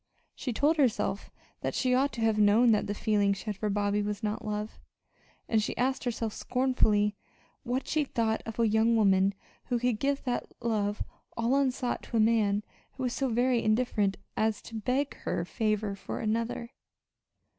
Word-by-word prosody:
She 255 - -4
told 295 +7 +2
herself 215 -7 +1 0.3
that - - -2
she 255 -1 +2
ought 275 +3 +3
to 230 - -5
have 220 -1 +2
known 215 +3 +5
that 210 - +2
the 205 - -2
feeling 205 -1 +2
she 195 - -8
had 210 -2 -2
for 210 +2 -2
Bobby 205 0 +1
was 205 +1 -3
not 210 0 -2
love 210 0 -4 0.7
and 220 -2 +2
she - - -3
asked 260 +2 0
herself 230 -2 -2
scornfully 220 -5 +1 0.5
what 255 +1 -2
she 310 -1 +1
thought 225 -5 -1
of 225 - -6
a 230 - +4
young 220 +2 +3
woman 195 -2 +3 0.3
who 245 - 0
could 240 -2 0
give 280 +1 0
that 245 -2 -2
love 210 -3 -1 0.3
all 230 +2 +1
unsought 260 -3 0
to 230 - -3
a - - +3
man 215 -2 +3 0.3
who 265 - -6
was 250 -1 0
so 270 -1 -1
very 245 +1 +2
indifferent 215 -3 +1 0.2
as 220 -1 +1
to - - -12
beg 250 +6 -1
her 170 - -2
favor 215 0 -1
for 195 - -6
another! 230 +2 -2
225 Hz, 180 wpm, -29 LUFS, 210-250 Hz, 0.7 s, known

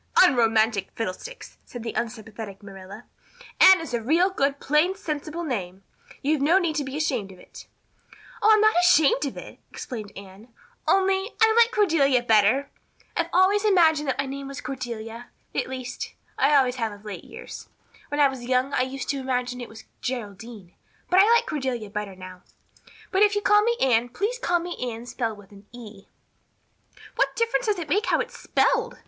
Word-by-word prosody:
"Unromantic 225 - +3
fiddlesticks!" 230 - -7
said 240 -2 -9
the 230 - -4
unsympathetic 220 -3 -6
Marilla. 195 -1 -11 0.5
"Anne 380 -1 +8
is 325 -6 -7
a 235 - 0
real 335 - +2
good 280 -5 0
plain 305 +6 +2
sensible 315 -2 -5
name. 195 - -4 0.4
You've 295 0 +1
no 320 +6 +4
need 340 -5 0
to 290 - 0
be 270 +1 -6
ashamed 255 -11 -2
of 185 - -14
it." - - -14 0.7
"Oh, 430 - +4
I'm 430 -1 +5
not 435 0 +5
ashamed 305 -5 +4
of 270 - -7
it," - - -10
explained 215 -6 -7
Anne, 200 +3 -12 0.4
"only 385 +1 +2
I 445 0 +5
like 470 0 +6
Cordelia 295 - +2
better. 225 +4 +3 0.4
I've 335 0 -1
always 380 +3 +3
imagined 325 -8 +3
that 265 - -1
my 275 - -1
name 275 +1 -6
was 275 -1 -7
Cordelia 240 -3 -6 0.3
at - - -1
least, 255 -1 -6 0.2
I 285 +2 +3
always 260 -2 +3
have 225 -3 -2
of 205 +1 -13
late 210 - -7
years. - - -10 0.4
When 290 - -4
I 290 - +6
was 265 -2 -6
young 255 +2 0
I - - +2
used 260 +1 -4
to 280 - -1
imagine 250 -1 -2
it 240 - -8
was 220 0 -12 0.2
Geraldine, 220 -5 -6 0.4
but 365 - +5
I 415 +4 +6
like 470 - +4
Cordelia 255 -8 -3
better 205 -2 -5
now. 185 0 -11 0.7
But 385 -1 +1
if 415 0 +4
you 410 - 0
call 415 +1 +5
me 470 +2 +1
Anne 245 -2 +2
please 415 - -3
call 350 -5 +1
me 350 0 -5
Anne 235 -2 -4
spelled 230 -3 -3
with 205 -1 -16
an 200 0 -16
E." 215 -5 -12 1.1
"What - - +1
difference 465 +1 0
does 420 -2 +1
it 335 -3 -5
make 410 +9 0
how - - +2
it's - - -4
spelled?" - - +1
265 Hz, 185 wpm, -24 LUFS, 225-345 Hz, 1.1 s, Anne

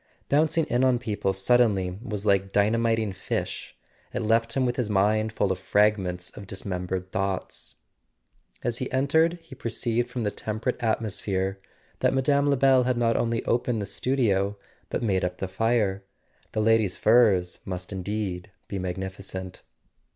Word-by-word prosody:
Bouncing 155 +2 +3
in 120 +2 +1
on 130 -2 +4
people 105 -5 -1
suddenly 95 -3 +2
was 105 -4 -5
like 100 -1 +2
dyna¬ 105 +4 +2
miting 115 -3 +1
fish: 90 - -4 0.3
it 120 - -3
left 115 +1 +2
him 130 - +3
with 120 -1 0
his 120 -4 -1
mind 105 +2 +2
full 100 -3 0
of 95 - -2
fragments 95 -4 +1
of 100 - -10
dismembered 90 -1 -4
thoughts. 95 -1 -3 0.9
As 120 0 -1
he 130 - -3
entered 145 +6 +3
he 165 - -13
perceived 120 0 -1
from 120 - -3
the 105 - 0
temperate 110 +6 -3
atmosphere 100 -4 -1 0.4
that - - +2
Mme. 140 +2 +2
Lebel 135 -1 +5
had 125 -1 +1
not 115 -1 +2
only 115 0 0
opened 120 -1 +1
the 100 - -2
studio 105 -5 0 0.3
but - - -2
made 95 -5 +1
up 90 0 -2
the 95 - -3
fire. 100 -1 0 0.5
The 110 - 0
lady's 110 -4 +3
furs 100 -7 +4
must 90 -1 -5
indeed 95 -1 -3 0.2
be 100 - -4
magnificent. 95 0 -5
105 Hz, 155 wpm, -26 LUFS, 95-120 Hz, 0.9 s, Lebel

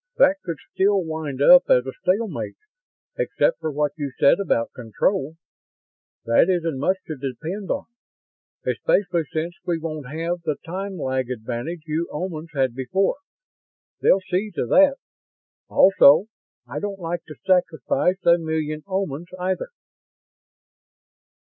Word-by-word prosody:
"That 485 -12 +5
could 165 -3 -4 0.2
still 195 0 +2
wind 155 -4 -3
up 265 - +7
as 125 0 +4
a 130 - -4
stalemate, 205 +4 -1 0.6
except - - +1
for 160 - -2
what 150 0 0
you 145 -3 -4
said 140 - +5
about 115 -12 0
control. 135 - -1 0.9
That 115 +9 +4
isn't 165 -6 0
much 185 +7 +1
to 155 - -5
depend 155 - -5
on, - - -2 0.8
especially 175 -4 +1
since 160 +2 -2
we 170 -2 -1
won't 155 -4 -5
have 165 +4 -3
the 155 -3 -1
time 190 +3 -5
lag 130 -4 -2
advantage 125 +7 -5
you 160 +2 -2
Omans 165 -1 -4
had 130 -3 +1
before. 185 - 0 0.8
They'll 195 - +4
see 185 +3 -2
to - - -1
that. 280 -1 +5 0.7
Also, 180 -3 +6 0.4
I - - -5
don't 205 -1 -4
like 170 -1 -4
to 155 - -10
sacrifice 180 0 +1
a 170 0 +6
million 155 -1 -2
Omans, 185 -4 -3
either." 185 - -2
165 Hz, 135 wpm, -23 LUFS, 145-190 Hz, 0.9 s, up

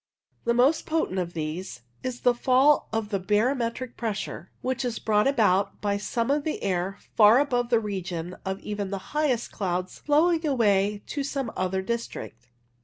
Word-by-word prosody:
The 235 0 +2
most 270 +6 +3
potent 310 - 0
of 175 -1 -3
these 155 -3 -4 0.2
is 255 -1 -5
a 245 - +6
fall 260 +4 +3
of 225 -2 -2
the 200 -2 -1
barometric 230 +5 0
pressure, 215 -3 -4
which 260 0 -1
is 245 -2 -2
brought 210 +1 +2
about 205 -8 +2
by 205 -1 0
some 230 +4 -1
of 290 0 +1
the 310 - -3
air 190 0 -1 0.2
far 215 +2 +7
above 245 -4 +1
the 235 -2 +4
region 180 -4 -4
of 190 0 -3
even 205 -2 -4
the 200 - -2 0.2
highest 290 -6 0
clouds 185 -2 -3
flowing 320 +3 +3
away 210 -7 +2
to 285 - -3
some 270 -4 -3
other 190 +1 -1
district. 190 - -5
225 Hz, 170 wpm, -26 LUFS, 195-255 Hz, 0.2 s, far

